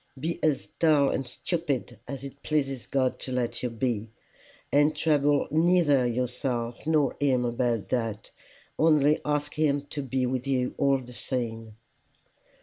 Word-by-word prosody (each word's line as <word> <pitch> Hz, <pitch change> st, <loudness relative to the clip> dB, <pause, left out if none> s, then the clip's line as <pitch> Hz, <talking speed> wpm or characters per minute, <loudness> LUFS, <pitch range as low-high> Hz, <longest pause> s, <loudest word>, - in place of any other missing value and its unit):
Be 165 Hz, +5 st, -3 dB
as 150 Hz, -4 st, +1 dB
dull 150 Hz, -4 st, +4 dB
and 135 Hz, -, -2 dB
stupid 135 Hz, -, -3 dB
as 140 Hz, -1 st, -6 dB
it 140 Hz, 0 st, -9 dB
pleases 135 Hz, -4 st, -1 dB
God 130 Hz, -2 st, 0 dB
to 130 Hz, -, -7 dB
let 120 Hz, -2 st, -2 dB
you 125 Hz, -, -1 dB
be, 115 Hz, -2 st, -2 dB, 0.6 s
and 145 Hz, +2 st, +4 dB
trouble 145 Hz, -2 st, +2 dB
neither 160 Hz, -5 st, +4 dB
yourself 120 Hz, +1 st, -2 dB
nor 150 Hz, -4 st, +2 dB
him 130 Hz, -3 st, +2 dB
about 120 Hz, -2 st, -1 dB
that, 115 Hz, -4 st, -2 dB, 0.5 s
only 150 Hz, -1 st, +4 dB
ask 145 Hz, 0 st, -1 dB
him 145 Hz, -2 st, +1 dB
to 145 Hz, -, -3 dB
be 130 Hz, -1 st, -1 dB
with 130 Hz, +1 st, -2 dB
you 125 Hz, -2 st, 0 dB
all 140 Hz, -1 st, +4 dB
the 125 Hz, -1 st, -10 dB
same." 115 Hz, -4 st, -4 dB
135 Hz, 145 wpm, -27 LUFS, 125-145 Hz, 0.6 s, dull